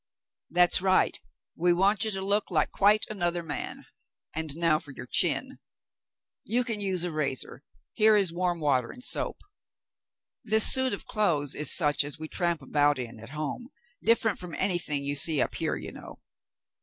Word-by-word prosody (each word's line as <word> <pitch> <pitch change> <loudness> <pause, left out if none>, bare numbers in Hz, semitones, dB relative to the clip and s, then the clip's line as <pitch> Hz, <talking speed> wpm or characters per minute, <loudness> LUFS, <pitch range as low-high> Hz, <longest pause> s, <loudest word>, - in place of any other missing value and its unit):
"That's 175 +1 +3
right; 185 0 +2 0.4
we 175 +1 +2
want 195 +4 +2
you - - 0
to 195 -2 -2
look 205 +1 0
like - - 0
quite 210 +2 +3
another 175 -4 -2
man. 150 -3 -5 0.5
And 160 -1 -4
now 165 -2 +2
for 150 - -14
your 130 - -9
chin. - - 0 0.8
You 240 +4 0
can 225 -4 -4
use 190 -3 -1
a 175 - -2
razor; 145 -4 -3 0.3
here 215 0 +4
is 195 -5 +1
warm 175 -1 -1
water 130 -6 +1
and 250 - -10
soap. - - +1 1.0
This 220 -1 +3
suit 260 -2 +2
of - - -10
clothes 155 -10 0
is 150 - +1
such 150 -3 +3
as 145 +2 -5
we 155 0 -7
tramp 170 -2 -2
about 145 +1 +2
in 120 -3 -7
at 115 +2 -11
home, 155 - -5 0.3
different 225 -2 +2
from 175 -3 -7
anything 175 -7 0
you 140 +1 -1
see 150 +1 +3
up - - +1
here, - - -1
you - - -7
know. - - -11
175 Hz, 175 wpm, -27 LUFS, 150-200 Hz, 1.0 s, here